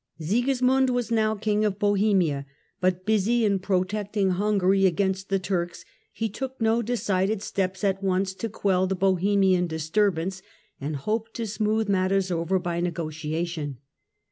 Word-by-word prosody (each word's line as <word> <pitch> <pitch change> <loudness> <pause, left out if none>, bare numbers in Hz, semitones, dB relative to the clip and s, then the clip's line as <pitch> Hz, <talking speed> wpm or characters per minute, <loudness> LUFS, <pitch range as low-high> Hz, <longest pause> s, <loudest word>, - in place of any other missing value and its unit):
Sigismund 255 - +2
was 245 -2 -1
now 220 -1 +2
King 210 0 0
of 205 -2 0
Bohemia; 195 -9 +2 0.3
but 185 0 0
busy 220 +2 +2
in 200 -2 +2
protecting 195 +1 0
Hungary 195 0 +3
against 190 +1 -1
the 195 - +2
Turks, 180 -2 -3 0.3
he 225 - -2
took 265 +5 -6
no 225 +1 +2
decided 205 -3 0
steps 190 -1 -2
at 195 -1 +1
once 190 0 0
to 225 +4 -4
quell 190 -3 +1
the 190 - -1
Bohemian 190 0 +2
disturb 165 +4 +1
ance, 190 +3 -4 0.4
and 145 +2 -3
hoped 220 +10 -3
to 230 - -2
smooth 215 +1 0
matters 190 -1 +1
over 170 +2 0
by 175 -2 -2
negotiation. 160 -3 -3
195 Hz, 145 wpm, -25 LUFS, 180-215 Hz, 0.4 s, Hungary